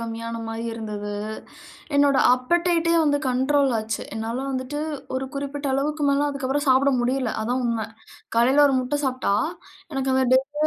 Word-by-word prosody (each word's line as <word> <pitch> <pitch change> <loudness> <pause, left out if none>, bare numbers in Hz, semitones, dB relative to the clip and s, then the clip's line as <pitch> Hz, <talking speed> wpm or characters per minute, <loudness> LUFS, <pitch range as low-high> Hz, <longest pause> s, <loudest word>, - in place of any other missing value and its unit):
கம்மியான 230 0 -5
மாதிரி 225 +1 -5
இருந்தது. 210 -2 -5 0.8
என்னுடைய 285 -1 +4
அப்படைட்டே 335 +5 +1
வந்து 290 -1 +2
கண்ட்ரோல் 270 +2 +2
ஆச்சு. 220 0 -3
என்னால 225 +2 -3
வந்துட்டு 260 +2 -3 0.4
ஒரு 265 +1 -3
குறிப்பிட்ட 280 +1 -4
அளவுக்கு 295 +3 0
மேல 280 +1 +2
அதுக்கு 275 -2 -3
அப்புறம் 290 +2 0
சாப்பிட 265 +2 +4
முடியல. 250 -1 0
அதுதான் 250 +3 -1
உண்மை. 230 -2 -1 0.5
காலையில 260 +5 +5
1 270 - +1
முட்டை 255 +3 -2
சாப்பிட்டா 255 -6 0 0.6
எனக்கு 270 -1 -1
அந்த 260 0 +3
டேவே 270 +3 +1
265 Hz, 150 wpm, -24 LUFS, 235-285 Hz, 0.8 s, காலையில